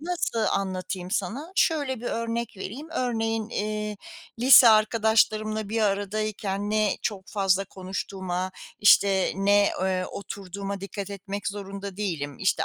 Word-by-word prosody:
nasıl 335 -7 -2
anlatayım 185 -1 -3
sana? 260 - -3
Şöyle 285 -7 +1
bir 240 - -6
örnek 230 0 -2
vereyim. 250 +12 -7
Örneğin, 225 -5 -1
eee, 210 -1 -3 0.4
lise 250 -1 +9
arkadaşlarımla 215 -1 +3
bir 225 0 0
aradayken 205 0 -1
ne 215 -2 +2
çok 195 -3 -3
fazla 195 -1 +1
konuştuğuma, 185 -1 -4 0.3
işte, 195 -2 +5
ne, 200 +1 +4
eee, 185 -1 0
oturduğuma 200 0 -6
dikkat 200 0 -6
etmek 200 0 -5
zorunda 200 -1 -7
değilim. 160 -9 -3
İşte, 190 - +1
205 Hz, 125 wpm, -26 LUFS, 195-220 Hz, 0.4 s, lise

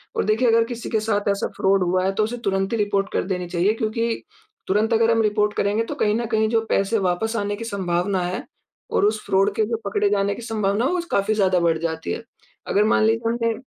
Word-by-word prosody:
और - - +1
देखिए 220 +4 +2
अगर 230 0 +4
किसी 235 -1 -6
के 220 - +1
साथ 210 -1 -1
ऐसा 200 0 0
फ़्रॉड 195 -1 +3
हुआ 185 +1 +1
है 195 - +2
तो, 215 - +1
उसे 240 +3 -3
तुरंत 195 +2 0
ही - - +1
रिपोर्ट 205 -2 0
कर - - +1
देनी 180 -1 -2
चाहिए 185 +5 +2
क्योंकि, 225 0 -2 0.4
तुरंत 215 +4 +1
अगर 230 0 +3
हम 225 0 +3
रिपोर्ट 210 -1 +1
करेंगे 205 +3 +1
तो - - -5
कहीं 210 0 +1
न 235 +1 -1
कहीं 220 0 +2
जो 225 -1 +2
पैसे 200 +3 +1
वापस 220 +6 -1
आने 205 0 -1
की 220 - -7
संभावना 185 -2 -1
है 185 +10 -4 0.5
और - - +2
उस 215 0 0
फ़्रॉड 195 +1 +2
के 220 - +2
जो 230 0 -1
पकड़े 205 0 +1
जाने 200 0 +1
की - - -9
संभावना 215 0 0
है, - - +1
वो 360 - 0
काफ़ी 200 +2 +1
ज़्यादा 190 -3 +3
बढ़ 170 -1 +2
जाती 160 - -3
है। - - -6 0.4
अगर 205 - +3
मान - - +3
लीजिए 225 +1 +1
हमने 230 0 0
210 Hz, 240 wpm, -22 LUFS, 195-225 Hz, 0.5 s, अगर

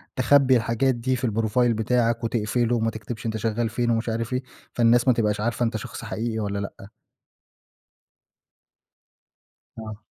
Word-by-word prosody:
تخبّي 130 0 +4
الحاجات 115 +3 +1
دي 130 +2 -1
في 125 0 -1
الprofile 115 +2 +1
بتاعك 115 +1 +1
وتقفله 115 +1 0
وما 115 -1 +1
تكتبش 110 +1 -7
أنت 110 -1 -1
شغّال 115 +1 -1
فين 120 +1 -1
ومش 115 +1 0
عارف 115 +2 -2
إيه، 125 +1 -1 0.3
فالناس 120 +1 +3
ما 130 - +6
تبقاش 105 -3 0
عارفة 120 +2 0
أنت 115 -1 -1
شخص 110 - -8
حقيقي 115 0 -3
والّا 100 -1 -2
لأ؟ 100 0 -7 2.9
آه. 110 0 -8
115 Hz, 145 wpm, -24 LUFS, 110-120 Hz, 2.9 s, ما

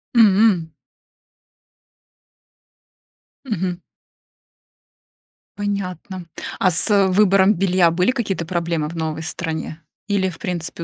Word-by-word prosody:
М. 200 -6 +4 2.7
Мгм. 185 -6 -3 1.8
Понятно. 190 -3 -4 0.3
А 185 - +3
с 195 +3 +4
выбором 195 0 +4
белья 180 -2 +2
были 180 +8 +2
какие-то 200 -9 -3
проблемы 170 -2 -2
в 170 - -8
новой 160 -1 -3
стране? 160 -1 -5 0.3
Или 200 -2 0
в 165 - -11
принципе 175 -4 -4
185 Hz, 90 wpm, -20 LUFS, 170-200 Hz, 2.7 s, М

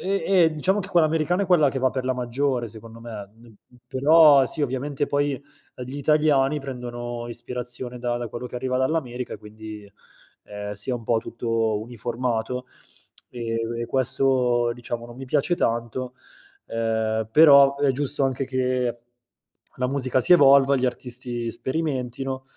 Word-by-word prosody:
E 195 +1 -1 0.2
e, 160 - +2
diciamo 185 +6 0
che 200 -1 -4
quella 170 -5 +4
americana 165 +4 0
è 195 - -2
quella 160 -6 +4
che 135 - -3
va 130 0 +2
per 130 0 -4
la 130 0 0
maggiore, 125 0 -1
secondo 115 +1 -12
me, 110 -4 -8
mhmm, 115 -1 -18 0.3
però, 145 0 +6
sì, 150 - -3
ovviamente, 140 +2 -2
poi, 145 -1 -1 0.3
di 125 +2 -7
italiani 150 -1 +2
prendono 120 -2 -6
ispirazione 125 +1 -6
da 120 0 -2
da 120 -1 -4
quello 120 +3 -6
che - - -12
arriva 130 0 -1
dall'America, 130 -4 -2
quindi, 105 0 -11 0.5
ehm, 105 0 -6
si 105 +5 -2
é - - 0
un 120 - -6
po' 115 0 +1
tutto 115 -2 -1
uniformato. 120 +2 -3 0.6
E 115 -2 -4 0.2
e 120 - -3
questo, 125 -2 +2
diciamo, 120 -1 -6
non 120 - -12
mi 135 - -7
piace 145 +6 +1
tanto, 120 +2 -2 0.5
uhm, 110 -1 -1
però, 140 -3 +7
è 140 -1 +2
giusto 140 +1 -1
anche 135 0 -1
che 125 -2 -1 0.8
la 125 0 -1
musica 130 -1 0
si 180 - +4
evolva, 140 -3 +6
gli 130 0 +1
artisti 120 -1 -4
sperimentino 130 -2 -3
125 Hz, 155 wpm, -24 LUFS, 120-140 Hz, 0.8 s, però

